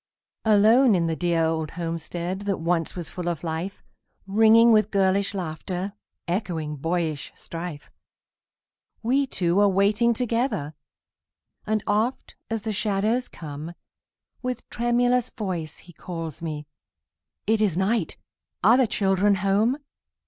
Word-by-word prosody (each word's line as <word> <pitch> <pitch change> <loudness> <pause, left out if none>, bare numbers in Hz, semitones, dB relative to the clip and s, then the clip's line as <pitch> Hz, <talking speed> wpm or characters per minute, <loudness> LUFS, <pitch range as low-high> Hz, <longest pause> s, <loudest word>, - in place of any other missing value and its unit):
Alone 220 +3 +6
in 170 -2 +1
the 165 -1 0
dear 170 -1 +1
old 160 -1 -1
homestead 170 +2 -3
That 195 - +1
once 165 0 -1
was 175 -4 -6
full 180 -2 -3
of 170 -2 -4
life, 165 +4 -4 0.4
Ringing 225 +3 +6
with 215 -1 +4
girlish 200 0 +1
laughter, 180 +2 -4 0.3
Echoing 170 -5 -2
boyish 165 -1 -2
strife, 165 -3 -7 1.1
We 270 +4 +2
two 175 -4 +1
are 205 0 +5
waiting 210 +5 +3
together; 230 - -1 0.9
And 215 -1 0
oft, 220 +5 -1
as 225 -2 -2
the 220 - -2
shadows 215 +4 0
come, 155 +2 -8 0.7
With 250 -1 -4
tremulous 245 +1 +2
voice 180 -8 -4
he 175 - -15
calls 165 -3 -6
me, 155 -2 -4 0.8
"It 220 +1 +2
is 195 -6 +2
night! 195 -1 0 0.5
are 225 +6 +7
the 260 -3 +4
children 200 0 +2
home?" 205 +7 +2
195 Hz, 125 wpm, -25 LUFS, 170-220 Hz, 1.1 s, are